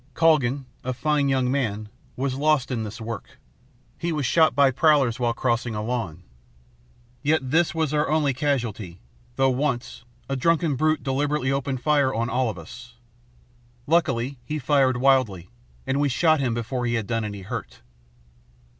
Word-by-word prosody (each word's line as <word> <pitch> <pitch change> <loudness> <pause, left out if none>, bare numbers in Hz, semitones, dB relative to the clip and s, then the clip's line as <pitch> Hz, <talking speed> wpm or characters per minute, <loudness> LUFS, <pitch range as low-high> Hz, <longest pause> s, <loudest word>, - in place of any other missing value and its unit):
Calgan, 145 -5 +2 0.2
a 130 - -2
fine 145 0 +1
young 130 -2 +1
man, 110 -6 -1 0.3
was 135 0 -1
lost 145 -1 +1
in 120 -3 -1
this 110 +1 -6
work. 115 -1 -7 0.6
He 170 0 -2
was 150 -4 -1
shot 160 0 +3
by 140 -1 +5
prowlers 135 -5 +3
while 120 -1 0
crossing 120 -2 -1
a 105 - -3
lawn. 110 -8 -3 1.0
Yet 145 -3 0
this 165 +1 +2
was 160 -2 0
our 150 0 +1
only 150 -3 +2
casualty, 120 - -2 0.4
though, 135 0 +3
once, 130 -3 -2 0.2
a 135 - -2
drunken 165 +1 +1
brute 155 +3 +1
deliberately 140 0 0
opened 135 -2 -2
fire 145 -3 +3
on 120 -1 -2
all 125 0 +1
of 105 - -6
us. 115 +9 -11 0.9
Luckily, 135 -5 +1
he 155 - -4
fired 135 -2 +2
wildly, 125 -8 +2 0.3
and 135 +1 0
we 145 - +2
shot 155 +4 +3
him 125 -4 0
before 120 +1 -2
he 120 - 0
had 115 -3 -1
done 115 +1 -1
any 100 -2 -5
hurt. 95 - -7
130 Hz, 165 wpm, -24 LUFS, 120-145 Hz, 1.0 s, by